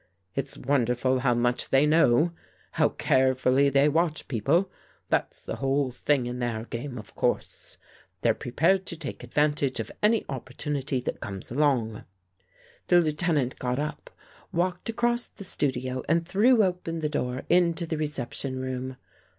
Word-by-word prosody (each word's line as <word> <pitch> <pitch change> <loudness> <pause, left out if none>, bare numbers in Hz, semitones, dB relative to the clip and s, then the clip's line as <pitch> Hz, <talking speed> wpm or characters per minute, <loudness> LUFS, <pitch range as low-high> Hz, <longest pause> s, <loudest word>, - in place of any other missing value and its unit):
It's 135 0 -2
wonderful 130 -1 +1
how 125 -2 +2
much 120 +1 +2
they 135 +2 +4
know; 155 0 +4 0.4
how - - +2
carefully 130 +1 +2
they 140 +1 +4
watch 160 +1 0
people. 150 - +1 0.4
That's - - -1
the - - -4
whole 135 0 0
thing 130 +1 0
in 125 +1 -4
their 115 -2 -2
gam^e, 125 +2 -6
of 105 - -10
course. - - -2 0.5
They're - - +4
prepared 185 +9 +1
to 170 - -3
take 150 -5 -6
ad - - -11
vantage 145 -3 +1
of 115 - -4
any 215 +1 +3
opportunity 135 0 -3
that - - -4
comes 95 +1 -5
along." 125 -6 +1 0.8
The 175 - +6
Lieutenant 155 -4 0
got 125 0 -1
up, 150 +1 -4 0.4
walked 180 +4 -1
across 240 +1 0
the - - -11
studio 130 -7 +1
and 165 +1 +2
threw 220 +5 +4
open 180 -3 -2
the 155 - 0
door 130 -3 -2
into 170 -1 +3
the 160 -1 -3
reception 135 -2 -1
room. 130 0 -4
140 Hz, 150 wpm, -27 LUFS, 125-165 Hz, 0.8 s, The